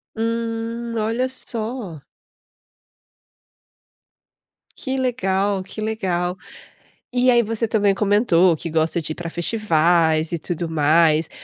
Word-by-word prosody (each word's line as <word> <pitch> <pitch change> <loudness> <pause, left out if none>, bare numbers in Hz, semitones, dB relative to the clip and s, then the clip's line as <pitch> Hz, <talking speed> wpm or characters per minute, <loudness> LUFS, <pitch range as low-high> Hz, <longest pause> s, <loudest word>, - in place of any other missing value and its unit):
Hum, 230 +1 -3
olha 225 +4 0
só! 225 - -4 2.7
Que 265 0 -4
legal, 200 -6 0
que 200 +3 -9
legal, 185 -5 -2 0.8
e 250 0 +4
aí 240 -1 +5
você 225 +1 -1
também 205 -2 +2
comentou 195 -4 +3
que 165 - -6
gosta 160 +1 0
de 155 0 -3
ir - - -14
para 175 -1 -6
festivais 165 -3 +1
e 170 - -1
tudo 170 +1 -3
mais, 160 0 +3
200 Hz, 110 wpm, -21 LUFS, 170-230 Hz, 2.7 s, aí